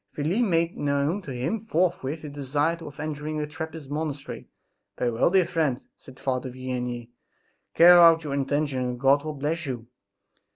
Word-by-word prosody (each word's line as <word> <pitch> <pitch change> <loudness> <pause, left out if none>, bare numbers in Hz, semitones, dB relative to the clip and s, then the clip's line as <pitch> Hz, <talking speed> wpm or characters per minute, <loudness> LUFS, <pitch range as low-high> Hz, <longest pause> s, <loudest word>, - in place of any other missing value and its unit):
Felix 160 +10 0
made 170 -6 +1
known 145 +6 0
to 165 - -10
him 130 - -2
forthwith 165 -5 0
his 150 -2 -7
desire 145 +3 0
of 150 -4 -10
entering 155 0 -4
a 150 - -1
Trappist 160 -1 -7
monastery. 150 -2 -4 0.5
"Very 120 - 0
well, 115 - +2
dear 185 -1 +4
friend," 155 -7 0 0.2
said 130 -1 -15
Father 130 -1 -2
Vianney, 125 -2 -4 0.7
"carry 170 +2 +9
out 165 -2 +7
your 145 -2 -4
intention 140 0 0
and 125 -1 -3
God 140 +2 +4
will 155 -1 -4
bless 155 +3 -2
you!" 120 -4 -4
145 Hz, 165 wpm, -26 LUFS, 135-165 Hz, 0.7 s, carry